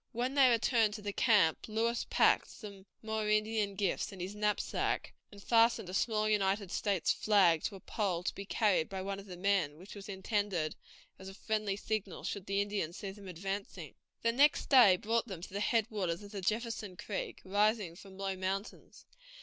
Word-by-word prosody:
When 245 +3 -1
they 275 -2 +6
returned 230 -2 +2
to 210 - -8
the 205 0 -3
camp 205 -10 +3
Lewis 230 +2 -1
packed - - +3
some 200 -3 -11 0.2
more 220 -1 -2
Indian 215 -1 +1
gifts 195 0 -1
in 195 - -11
his 185 +3 -4
knapsack, 210 0 -1 0.2
and 200 -1 -13
fastened 230 -5 +3
a - - -7
small 215 +1 +1
United 200 -2 +1
States 200 -4 +1
flag 185 -7 +3
to - - -3
a - - -9
pole 185 -3 -2
to - - -2
be 200 - -7
carried 200 -4 +1
by 190 -1 -4
one 195 0 -4
of 200 - -12
the 180 -2 -8
men, 180 -6 +1
which 185 +4 -11
was 205 +1 -10
intended 190 -5 -1 0.4
as 190 0 -8
a 195 - -11
friendly 215 -2 -1
signal 205 -2 -4
should 200 -1 -4
the 200 +1 +1
Indians 200 -5 -3
see 195 - -5
them 200 0 -12
advancing. 190 -2 -5 0.3
The 230 - +3
next 280 +5 +3
day 245 -9 +8
brought 230 +4 0
them 190 -6 -7
to 190 - -9
the 200 - -2
head 220 +1 +2
waters 185 -3 -2
of 200 - -11
the 200 -2 -5
Jefferson 215 -2 -2
River, 205 - -3
rising 205 -2 +1
from 190 +1 -13
low 195 -1 -2
mountains. 190 +3 -5
200 Hz, 195 wpm, -33 LUFS, 190-215 Hz, 0.4 s, day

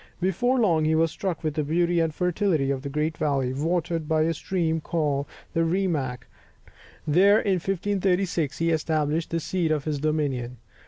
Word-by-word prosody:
Before 240 +8 +1
long 170 -9 +3
he 160 +1 +2
was 165 0 +2
struck 180 -3 -4
with 155 -2 -1
the 155 0 -1
beauty 170 +3 +1
and 165 -1 +1
fertility 175 -4 0
of 135 -1 -3
a 140 - -4
great 150 +3 -1
valley, 135 -4 0
watered 165 +2 -1
by 155 -1 +3
a 165 +1 +1
stream 160 -1 -1
called 145 -4 -1 0.3
the 165 - +2
Rimac, 160 -8 -1 0.8
and 150 - -1
there 200 +4 +6
in 195 -3 +1
1536, 185 -4 0
he 165 0 +1
established 155 0 0
the 165 - -1
seat 170 0 -1
of 155 -2 0
his 150 -2 -2
dominion. 135 -5 -1
160 Hz, 175 wpm, -25 LUFS, 150-180 Hz, 0.8 s, there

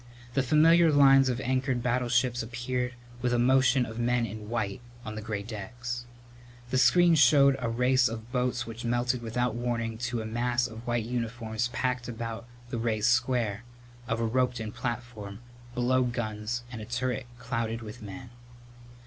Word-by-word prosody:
The 135 - +2
familiar 160 +5 +5
lines 135 -2 +6
of 125 -1 -1
anchored 130 -1 0
battleships 120 0 +1
appeared 125 +1 -3 0.3
with 125 -1 +1
a - - +3
motion 130 +1 +4
of 110 0 -7
men 120 0 +1
in 110 0 -7
white 110 -2 -2 0.2
on 110 - -5
the 110 - -5
gray 105 -2 -4
decks. 120 +3 -6 0.7
The 130 - +2
screen 170 +8 +5
showed 140 -2 +6
a 120 -2 -1
race 125 +1 +3
of 115 +1 -7
boats 125 -1 0
which 115 +1 -8
melted 120 +1 0
without 120 +1 -1
warning 115 -1 -2
to 120 -1 -2
a - - -7
mass 120 +2 0
of 115 +1 -8
white 120 -2 0
uniforms 115 -1 -2
packed 125 0 -2
about 115 -1 -5 0.2
the 115 - -2
raised 110 0 +1
square 120 -3 +1 0.4
of 115 +1 -1
a 115 - +1
roped 125 +1 +1
in 110 -1 -4
Platform 120 -4 -5 0.4
below 125 +1 +2
guns 120 -1 -2
and 115 -3 -6
a - - -6
turret 120 +1 -2
clouded 115 -1 -3
with 110 +2 -9
men. 115 +4 -9
120 Hz, 165 wpm, -28 LUFS, 115-125 Hz, 0.7 s, lines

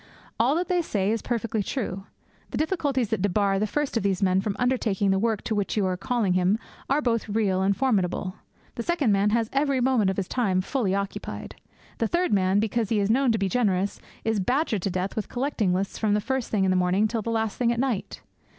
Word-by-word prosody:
All 250 +6 +3
that 355 +2 0
they 360 -2 +2
say 205 - 0
is 225 -1 -1
perfectly 230 -3 -1
true. 195 -4 -4 0.4
The - - -4
difficulties 285 - 0
that 220 - -1
debar 200 0 +2
the 215 - +1
first 295 +4 -2
of 230 - +2
these 195 -1 0
men 190 0 +3
from 200 0 -2
undertaking 225 -6 +1
the 190 - +2
work 220 -1 0
to - - -2
which 205 0 -1
you 205 - +2
are 185 -1 0
calling 210 0 0
him 185 +3 +2 0.3
are 290 +2 +2
both 230 -3 0
real 200 -3 +1
and 195 +1 +2
formidable; 190 -7 0 0.4
the - - -4
second 300 -5 +1
man 200 +1 +3
has 225 +1 +1
every 275 -1 +2
moment 245 -6 +2
of 190 - -2
his 195 -2 -1
time 200 -7 +1
fully 200 -2 -1
occupied; 200 0 -4 0.5
the 230 - +1
third 350 0 +1
man, 190 0 +3
because 220 0 0
he 220 - +2
is 200 +1 +2
known 260 +1 +3
to 225 - +1
be 195 -2 0
generous, 200 -3 0 0.2
is 225 -2 0
badgered 245 - 0
to 195 - -1
death 185 +1 -2
with 215 - -3
collecting 245 -7 0
lists 190 +2 -2
from 210 -2 +2
the - - +2
first 265 +2 -2
thing 205 -3 +1
in 190 - +2
the - - +2
morning 185 +4 +2
till 225 0 -2
the 230 - -4
last 225 -2 -1
thing 240 -1 +3
at 235 - -1
night. 250 -6 -2
215 Hz, 230 wpm, -26 LUFS, 195-245 Hz, 0.5 s, All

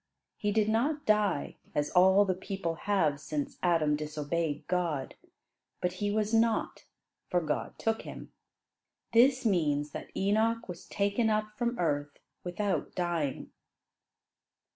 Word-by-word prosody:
He 205 - -1
did 215 0 +2
not 285 +7 +1
die, 210 - +1 0.2
as 145 0 0
all 190 +3 +6
the 190 - +1
people 190 -2 -3
have 160 -5 +1
since 145 0 -4
Adam 165 -4 +3
disobeyed 150 +1 -2
God, 170 -7 -1 0.7
but 180 0 -1
"he 205 - +1
was 215 +1 0
not, 225 0 +1 0.4
for 180 - +2
God 155 -3 -3
took 225 0 0
him." - - -9 0.8
This 255 +2 +5
means 150 -7 +1
that - - -7
Enoch 220 +4 +1
was 175 -2 -8
taken 205 +3 +1
up 215 0 -1
from 240 +1 -1
earth 145 -4 -1 0.3
without 190 +3 -2
dying. 170 -6 -2
185 Hz, 130 wpm, -30 LUFS, 155-215 Hz, 0.8 s, all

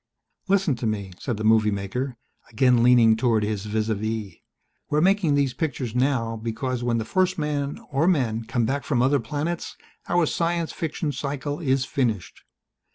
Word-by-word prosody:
"Listen 195 -5 +2
to 120 - -2
me," 100 -3 -3
said 120 -5 -3
the 110 - -4
movie 110 -1 +4
maker, 115 +6 -3 0.3
again 125 +1 +3
leaning 120 -2 +6
toward 115 -2 +2
his 105 -1 -2
vis 110 +1 -1
à 110 - +1
vis. 110 -1 -3 0.6
"We're 150 - +2
making 180 -3 +3
these 140 -3 +1
pictures 130 -5 -3
now 125 -3 0
because 120 +3 -3
when 120 -1 +1
the 110 - -2
first 185 +7 +1
man 145 -2 -2
or 145 +5 +2
men 115 -10 +1
come 120 0 0
back 140 +4 -1
from 125 -4 +1
other 140 +2 +3
planets 155 +6 -4 0.3
our 175 -1 +3
science 170 +1 -1
fiction 160 -2 -3
cycle 145 +1 -4
is 135 -4 +1
finished. 110 - -2
125 Hz, 170 wpm, -24 LUFS, 110-145 Hz, 0.6 s, leaning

